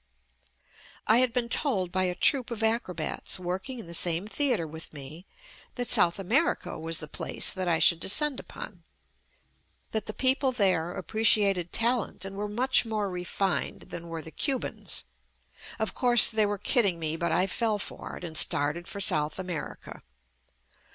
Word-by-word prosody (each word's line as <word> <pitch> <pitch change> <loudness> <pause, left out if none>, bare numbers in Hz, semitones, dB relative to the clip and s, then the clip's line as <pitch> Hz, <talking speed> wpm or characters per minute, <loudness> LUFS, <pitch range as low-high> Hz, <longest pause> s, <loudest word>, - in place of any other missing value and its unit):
I 220 - +5
had 255 -1 +3
been 240 -1 -1
told 210 - +1
by 185 0 +1
a 180 -1 -2
troupe 260 +3 +2
of 230 -2 -5
acrobats 190 -7 0
working 185 +9 -5
in 230 - -8
the 170 - -9
same 170 +2 +4
theatre 240 - 0
with 160 +1 -9
me 150 +5 -10 0.5
that 245 -1 -1
South 175 -4 +4
America 225 - 0
was 165 0 -1
the 155 - -7
place - - 0
that 185 -1 -4
I 165 -2 +2
should 165 +1 +4
descend 280 - +3
upon, 180 -5 -10 1.1
that 220 -2 -3
the 215 - -4
people 265 0 +2
there 185 -7 +1
appre 215 +5 -5
JUST 225 - +8
ME 210 - +1
ciated 185 -4 0
talent 235 -4 0
and 195 0 -7
were 205 +1 -4
much 255 +5 +3
more 215 -4 -3
refined 180 -2 -2
than 170 0 -7
were 165 -1 -6
the 160 - -10
Cubans. 220 - -4 0.7
Of 220 - -2
course, 245 -2 +5
they 215 -2 +2
were 205 0 -2
kid 225 +5 +1
ding 190 -6 0
me, 160 -1 -1
but 170 0 -2
I 170 +3 +2
fell 215 +2 -1
for 200 - -7
it - - -12
and 165 -2 -7
started 155 +4 0
for 200 - -7
South 150 -5 +1
America. 180 -4 -7
195 Hz, 180 wpm, -27 LUFS, 170-230 Hz, 1.1 s, JUST